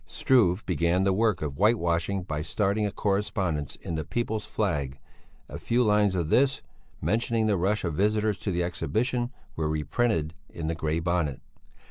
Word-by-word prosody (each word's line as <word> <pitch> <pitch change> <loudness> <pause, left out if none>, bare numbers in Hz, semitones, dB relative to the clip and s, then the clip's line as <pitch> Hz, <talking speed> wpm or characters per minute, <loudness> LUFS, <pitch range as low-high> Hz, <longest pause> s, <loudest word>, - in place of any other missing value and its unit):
Struve 110 -7 +2
began 85 +1 +1
the 95 0 +3
work 105 -4 +1
of 70 -1 -4
whitewashing 95 -3 +2
by 75 -4 -3
starting 105 +5 0
a - - -4
correspondence 95 -8 -1
in - - -7
the 80 -1 -2
People's 110 +4 -2
Flag; 70 -2 -1 0.5
a - - -7
few 120 +1 +1
lines 105 -3 +3
of 85 -4 -1
this, 135 +5 +3 0.4
mentioning 110 +5 +1
the 105 -2 +2
rush 100 +4 0
of 85 -3 -1
visitors 105 +3 +1
to - - -3
the 90 -2 0
Exhibition, 120 +8 -1 0.3
were 80 -1 -1
reprinted 80 +2 0 0.2
in 80 - -6
the 80 - 0
Grey 80 0 -1
Bonnet. 85 -5 -1
95 Hz, 165 wpm, -27 LUFS, 80-110 Hz, 0.5 s, the